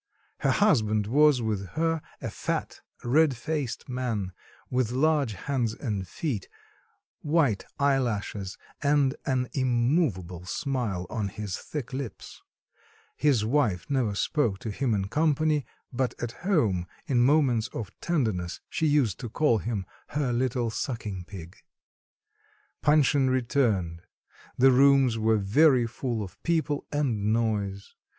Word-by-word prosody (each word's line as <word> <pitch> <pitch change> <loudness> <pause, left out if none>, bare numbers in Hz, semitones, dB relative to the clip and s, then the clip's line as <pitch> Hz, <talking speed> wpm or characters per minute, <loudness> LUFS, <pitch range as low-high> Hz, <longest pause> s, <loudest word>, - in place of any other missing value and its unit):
Her - - +1
husband 110 - +3
was 140 +2 +4
with 105 -3 -1
her, 165 0 0 0.2
a - - -3
fat - - -3 0.2
red 140 +1 +3
faced 145 -1 -3
man, 120 -7 -2 0.4
with 125 -3 +1
large 140 -2 +2
hands 120 +1 -2
and 100 -7 -3
feet, 120 - -4 0.7
white 145 - +1
eye 140 -1 +3
lashes, 105 -5 -3 0.2
and 145 -2 +3
an 130 -2 +1
immovable 120 - 0
smile 115 -9 -2
on 110 -3 -1
his 100 -1 -5
thick 140 -4 -6
lips; 130 -5 -6 0.7
his 135 -8 +2
wife 115 -8 +1
never 120 -7 +1
spoke 115 -3 0
to 110 - -4
him 120 +1 0
in 95 -1 -1
company, 155 +1 +1 0.3
but 130 0 -1
at 120 - -3
home, 115 - 0 0.2
in 125 -3 +1
moments 130 -4 +3
of 105 -3 -6
tenderness, 110 - -1
she 160 - +1
used 140 -10 +2
to 120 - -5
call 120 -3 +2
him 105 -4 -3 0.3
her 135 -5 0
little 120 -1 0
sucking 105 -7 -4
pig. 90 -3 -10 1.2
Panshin 145 -1 +4
returned; 115 - 0 0.6
the 135 +1 +6
rooms 135 -3 +5
were 110 0 +3
very 125 +5 +4
full 115 -1 -3
of 95 -1 -11
people 160 -4 0
and 115 -8 0
noise. 105 -4 -1
125 Hz, 130 wpm, -27 LUFS, 105-145 Hz, 1.2 s, the